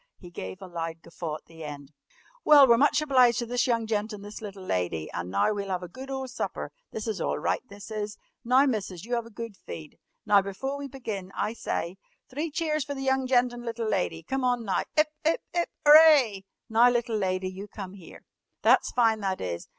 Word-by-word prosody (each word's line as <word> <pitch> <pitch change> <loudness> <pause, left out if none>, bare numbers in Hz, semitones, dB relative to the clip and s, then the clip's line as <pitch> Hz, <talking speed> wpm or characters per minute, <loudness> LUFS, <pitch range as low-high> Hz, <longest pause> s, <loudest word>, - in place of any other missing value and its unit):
He 175 -2 -13
gave 95 - -7
a - - -8
loud 165 -1 -5
guffaw 165 -2 -5
at - - -11
the 165 -1 -12
end. 145 -1 -8 0.5
"Well, 290 -3 +8
we're 235 - +7
much 295 +1 +4
obliged 255 -5 +4
to 240 - -1
this 245 +2 0
young 230 -2 +1
gent 215 0 -1
and 205 -1 -8
this 205 +1 -8
little 200 -3 -8
lady, 90 - -2
and 85 +1 -4
now 100 - +2
we'll 200 -1 -4
'ave 180 -1 -2
a - - -11
good 265 +8 -9
ole 265 -1 -3
supper. 250 - -4 0.2
This 220 +1 -5
is 215 -3 -2
all - - 0
right, - - 0
this 200 +2 -11
is! 210 -1 -4 0.3
Now, 255 +3 +5
Missus, 205 -8 -2
you 240 +1 -1
'ave 235 -1 -3
a - - -12
good 230 -1 -7
feed. 155 -4 -10 0.3
Now, 205 -2 +5
'fore 270 +7 -4
we 280 - -5
begin, 220 -8 -6
I 215 - -1
sye 185 -5 -3 0.3
three 300 +6 -3
cheers 310 -1 -1
fer 285 +1 -5
the 270 - -5
young 265 -1 +1
gent 250 -1 +3
and 240 0 -8
little 230 -1 -3
lady. 170 -5 -1
Come 265 +9 -2
on, 245 -2 +1
now, 195 - +1 0.2
'Ip, 305 0 +4
'ip, 320 +2 +2
'ip, 345 -1 0 0.2
'ooray! 295 -10 +7 0.2
Now, 230 +2 +5
little 235 -2 0
lady, 185 -2 -1
you 195 +2 -8
come 195 -3 -8
'ere. 190 -4 -13 0.4
That's - - +5
fine, 225 -3 +3
that 190 -2 -2
is! 85 -2 -4
220 Hz, 220 wpm, -27 LUFS, 185-255 Hz, 0.5 s, Well